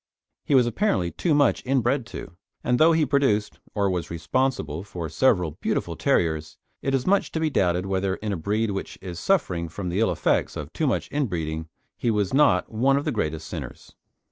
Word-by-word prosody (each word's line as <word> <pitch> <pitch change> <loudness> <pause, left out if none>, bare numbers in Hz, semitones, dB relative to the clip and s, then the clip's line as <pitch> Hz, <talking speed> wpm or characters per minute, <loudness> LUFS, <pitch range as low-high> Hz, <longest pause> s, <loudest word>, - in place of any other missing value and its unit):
He 145 - +2
was 125 -2 +6
apparently 115 - 0
too 155 - +1
much 145 -4 +3
inbred 130 -1 +1
to, 80 - -8 0.3
and 125 0 +1
though 160 +2 +7
he 160 -1 +3
produced 130 -8 +1 0.2
or 100 -1 +2
was 90 -3 -2
responsible 85 - -1
for 90 -5 -5
several 90 - +2
beautiful - - -1
terriers, 80 -2 0 0.2
it 135 0 0
is 130 - -1
much 200 +1 +2
to 160 - -1
be 160 -1 0
doubted 90 -5 +1
whether 95 0 0
in 105 0 -3
a - - -1
breed 105 +6 -1
which 95 - -5
is 90 -3 -7
suffering 90 - +1
from 90 +2 -5
the 90 +4 -1
ill 115 - +3
effects - - 0
of 75 +1 -7
too 155 - 0
much 125 - 0
inbreeding, 80 - -2 0.3
he 120 - 0
was 105 -2 0
not 145 +2 +3
one 130 +5 +3
of 140 - -2
the 155 - 0
greatest 80 - -2
sinners. - - -8
105 Hz, 195 wpm, -25 LUFS, 85-135 Hz, 0.3 s, though